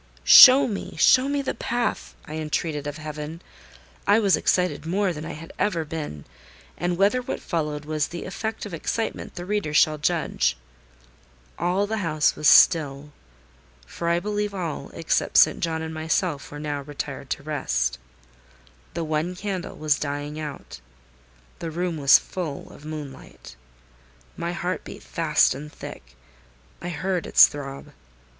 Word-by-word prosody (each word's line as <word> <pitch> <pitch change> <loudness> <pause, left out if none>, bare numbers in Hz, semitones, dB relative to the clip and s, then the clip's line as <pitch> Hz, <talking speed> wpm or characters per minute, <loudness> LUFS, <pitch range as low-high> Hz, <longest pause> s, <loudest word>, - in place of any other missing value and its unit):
"Show 265 +1 +10
me, 205 -5 -5
show 260 +2 +5
me 285 0 -1
the - - -2
path!" 240 -1 -3
I 155 - -6
entreated 150 -1 -2
of 145 +1 -5
Heaven. 155 +1 -7 0.7
I 205 +1 +6
was 200 -4 +4
excited 180 -1 0
more 190 +1 0
than 155 0 -7
I 170 - -6
had 165 +2 -10
ever 185 -5 0
been; 150 - -6 0.5
and 175 +1 -2
whether 205 +7 +3
what 245 - -4
followed 150 -4 -3
was 155 -1 -1
the 170 - -7
effect 220 +4 -4
of 205 - -8
excitement 225 +7 -3
the 175 - -6
reader 195 -6 -2
shall 155 +1 +4
judge. 150 - 0 1.0
All 180 +4 +1
the 220 +1 -3
house 155 -5 +1
was 150 - 0
still; 145 -3 +5 0.7
for 170 - -4
I 170 0 +2
believe 205 +1 -3
all, 170 -5 -4
except 165 - 0
St. - - +6
John 160 -1 -2
and 160 0 -5
myself, 160 -1 -1
were 145 - -8
now 145 -1 -3
retired 140 -1 -7
to - - -3
rest. 65 - -1 1.0
The 170 - -2
one 160 +3 -2
candle 190 -2 -5
was 150 -1 +1
dying 145 +1 -4
out: 150 - -8 0.8
the 165 - -4
room 170 +1 -2
was 140 -2 +7
full 165 -7 -6
of 145 - -14
moonlight. 150 - -9 0.8
My 170 - -3
heart 180 +1 -3
beat - - -10
fast 160 -5 +2
and 150 +3 -9
thick: 60 - -11 0.7
I 175 - -4
heard 180 +2 -2
its - - +8
throb. 145 0 -8
160 Hz, 155 wpm, -24 LUFS, 150-180 Hz, 1.0 s, Show